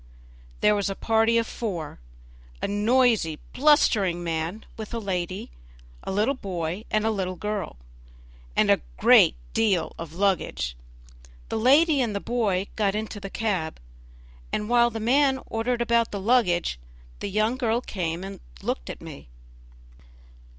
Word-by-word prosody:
There 210 - +5
was 205 -1 0
a 195 - -3
party 225 +2 +2
of 230 - +2
four; 180 -11 -5 0.6
a - - -2
noisy, 210 -5 +2 0.2
blustering 215 - +3
man 165 +5 -3
with 220 +1 -6
a - - -1
lady, 185 - -3 0.5
a - - -5
little 210 +7 +2
boy 185 - -4
and 215 0 +1
a 225 - +2
young 185 -3 -3
girl, 210 - -3 0.8
and - - +4
a - - +3 0.2
great - - +6 0.2
deal 195 -7 +1
of 165 -1 -7
luggage. 160 - 0 0.7
The 225 - -1
lady 285 +5 +5
and 225 -5 -1
the - - 0
boy 205 -5 0
got 205 -2 +1
into 215 0 -4
the 195 0 -7
cab, 190 -8 -2 0.7
and 210 +1 -2
while 240 0 +5
the 225 -1 -5
man 265 +4 +3
ordered 235 +2 -1
about 235 -1 +2
the 200 - -4
luggage 190 - +2 0.4
the - - -4
young 215 +4 +1
girl 235 -2 +1
came 175 -7 -4
and 195 +1 -7 0.2
looked - - -3
at - - -7
me. - - -10
210 Hz, 150 wpm, -25 LUFS, 185-230 Hz, 0.8 s, great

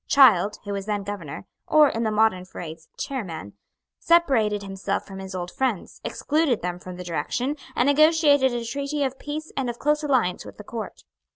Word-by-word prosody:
Child, 215 -8 +6
who 205 - -4
was 200 0 -4
then 205 -1 -1
Governor, 195 -5 -6 0.2
or, 305 -1 +6
in 230 -4 -2
the 225 - +1
modern 215 -4 +2
phrase, 165 -3 -9
Chairman, 175 - -5 0.5
separated 245 -12 +3
himself 195 0 -3
from 195 -1 -9
his 190 -1 -7
old 180 -1 -4
friends, 255 -8 -2
excluded 295 - 0
them 180 0 -3
from 180 0 -8
the 180 - -7
direction, 180 - -2 0.2
and 245 - +3
negotiated 290 -2 +5
a 240 -1 -3
treaty 280 +4 -2
of 265 -1 -2
peace 305 +2 -5
and 265 -3 -1
of 240 - -5
close 300 +3 +1
alliance 255 -12 +1
with - - -11
the 210 - -9
Court. 225 +1 -7
225 Hz, 185 wpm, -24 LUFS, 190-280 Hz, 0.5 s, Child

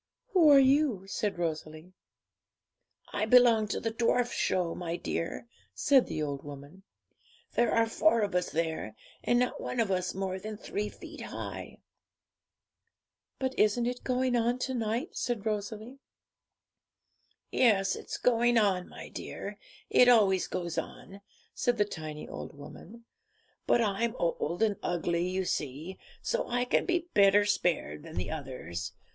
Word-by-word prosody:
'Who 355 -8 +5
are 285 - +9
you?' 270 -7 +3
said 205 0 -2
Rosalie. 160 +1 -4 1.2
'I 215 +1 0
belong 235 -3 +6
to - - -2
the 225 - -2
Dwarf 240 +1 +1
Show, 180 -3 0
my 170 -1 -4
dear,' 165 +3 -4 0.3
said 275 -3 +4
the 155 - -3
old 140 -2 -4
woman. 145 +5 -10 0.7
'There 240 - +2
are 230 0 +4
four 230 +1 +3
of 200 -2 -1
us 180 0 0
there, 160 -9 -2 0.3
and 240 - +3
not 250 0 0
one 250 - -3
of 220 -4 +1
us 185 -1 -1
more 190 -1 -3
than 215 +2 -6
three 210 0 -3
feet - - -11
high.' - - -7 1.6
'But 260 -1 -2
isn't 215 +3 +3
it 245 +1 -3
going 255 -1 +1
on 240 +1 +1
to 260 - -4
night?' 235 +5 -2
said 240 -4 -2
Rosalie. 215 +4 -4 1.5
'Yes, 205 -6 +3
it's - - -6
going 240 0 +3
on, 195 -4 +2
my - - -9
dear; - - -7 0.3
it 250 - +7
always 200 -6 +4
goes 175 -2 -3
on,' 195 +1 -9 0.3
said 245 -2 0
the 205 - +3
tiny 155 -5 -7
old 145 - -8
woman; 230 +10 -12 0.6
but 240 - +4
I'm 225 +2 0
old 170 -2 -1
and 210 -3 +1
ugly, 175 0 -1
you 185 +1 -1
see, 155 +5 -4 0.2
so - - -1
I 245 +1 0
can 250 - +1
be 350 -2 0
better 200 0 +5
spared 170 - 0
than - - -11
the 90 - -3
others. 130 - -5
205 Hz, 150 wpm, -30 LUFS, 175-240 Hz, 1.6 s, are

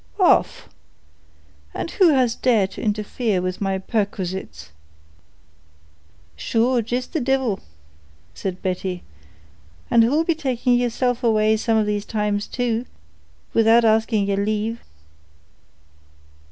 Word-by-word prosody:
"Off! - - +3 1.1
And - - -4
who 370 -4 +4
has 255 -6 +3
dared 220 -7 +1
to - - -8
interfere 210 0 -1
with 185 +1 -4
my 195 -1 0
perquisites?" 190 - -4 1.6
"Sure, 235 - +1
jist 245 +3 -4
the 320 - 0
divil," 260 -5 0 0.7
said 185 -2 -5
Betty; 180 -1 -3 0.9
"and 235 -1 +6
who'll 290 +8 +2
be 335 - +1
taking 260 -5 0
yeerself 245 0 0
away 215 -1 +3
some 225 +1 +1
of 215 - +2
these 210 -1 -2
times 210 -2 -2
too, 245 -1 -2 0.7
without 230 +1 +5
asking 220 -1 +2
yeer 200 0 0
lave." 215 +2 -2
220 Hz, 115 wpm, -22 LUFS, 200-245 Hz, 1.6 s, and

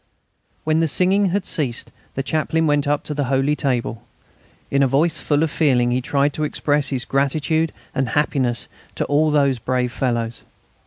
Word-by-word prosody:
When 155 0 +2
the 165 - +2
singing 190 +6 +2
had 190 +1 -1
ceased 135 -8 -2 0.2
the 135 - -1
Chaplain 160 +2 0
went 145 -2 +2
up 145 0 +1
to 150 - -4
the 145 -1 -1
holy 135 +3 +1
table. 125 -6 -1 0.7
In 140 - +2
a 135 - +5
voice 150 +4 +1
full 145 +1 +1
of 160 - 0
feeling 125 -6 +2
he 125 +1 +1
tried 140 +2 +1
to 155 - -3
express 145 -1 0
his 130 -3 -2
gratitude 150 +4 0 0.2
and 135 -2 -1
happiness 130 -4 0 0.3
to - - -1
all 150 +2 +2
those 140 -4 +2
brave 125 +1 -1
fellows. 120 -1 -2
145 Hz, 175 wpm, -21 LUFS, 130-155 Hz, 0.7 s, a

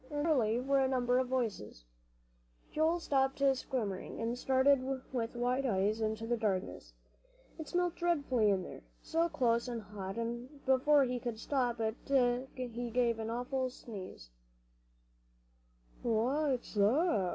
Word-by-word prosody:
And 290 0 -2
there 325 - +4
surely 230 -4 +2
were 275 +2 +2
a 265 - +3
number 250 -1 +2
of 260 - 0
voices. 220 - -3 0.9
Joel 320 +3 +2
stopped 270 -4 +1
squirming, 230 -7 -4
and 230 +1 -1
stared 265 +2 +3 0.3
with 235 -1 -2
wide 250 +3 +1
eyes 210 +1 +1
into 220 +1 -1
the 240 +1 0
darkness. 200 -4 -2 0.7
It 315 - -6
smelt 355 -1 0
dreadfully 285 -10 +2
in 190 -2 +1
there, - - -9 0.2
so 335 +1 +1
close 240 -6 +1
and 240 -2 -3
hot, 195 -1 -7
and 240 +5 -5
before 275 +2 +5
he 250 -1 -1
could 235 -1 -4
stop 245 -1 -1
it 220 +1 -1 0.6
he 245 -1 -4
gave 235 -1 +1
an 220 0 -3
awful 255 +2 -2
sneeze. 195 - -10 1.7
"What's 255 +4 0
that?" 210 - +3
245 Hz, 140 wpm, -33 LUFS, 225-270 Hz, 1.7 s, before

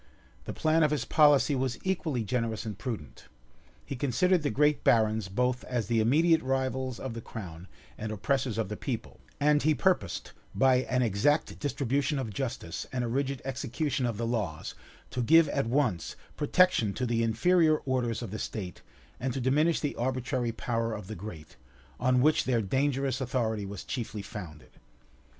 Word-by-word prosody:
The - - -4
plan 160 +1 +2
of 155 - +4
his 145 -6 -1
policy 145 -1 +5
was 130 -2 -1
equally 160 -10 -1
generous 115 0 -2
and 110 -2 -4
prudent. 105 - -6 0.6
He 140 - -5
considered 165 +8 +2
the 145 - 0
great 150 +5 +2
barons 110 -2 +3
both 125 +5 0
as 120 -3 -2
the 115 +2 +1
immediate 160 +8 +4
rivals 130 -1 -1
of 130 -3 -5
the 115 - -6
crown 90 -6 -8 0.3
and 110 0 -4
oppressors 125 +2 -1
of 110 -3 0
the 105 - -4
people; 120 0 -5 0.2
and 150 0 +4
he 155 +1 +3
purposed, - - 0 0.2
by 130 -1 +5
an 125 0 +2
exact 120 +8 +1
distribution 140 0 0
of 120 -6 -3
justice, 120 -8 -4
and 125 -1 -1
a - - -1
rigid 135 +2 -2
execution 130 0 -2
of 115 -3 -3
the 115 - -2
laws, 105 -10 -2 0.4
to 125 - -2
give 165 +6 +6
at 140 -5 0
once 120 - 0 0.2
protection 150 - +3
to 125 - -1
the 115 -1 0
inferior 155 +8 +3
orders 120 -3 -1
of 110 - -6
the 110 - -5
state, 95 -5 -5 0.4
and 130 0 -2
to - - -1
diminish 150 +6 +2
the 145 - -2
arbitrary 125 0 -1
power 115 0 -2
of 105 -2 -7
the 110 +3 -7
great, 85 -8 -9 0.4
on 125 0 +3
which 155 +1 +3
their 120 -4 +1
dangerous 135 +4 0
authority 110 -5 -1
was 100 -1 -7
chiefly 110 -5 -4
founded. 90 -8 -9
125 Hz, 170 wpm, -29 LUFS, 110-140 Hz, 0.6 s, give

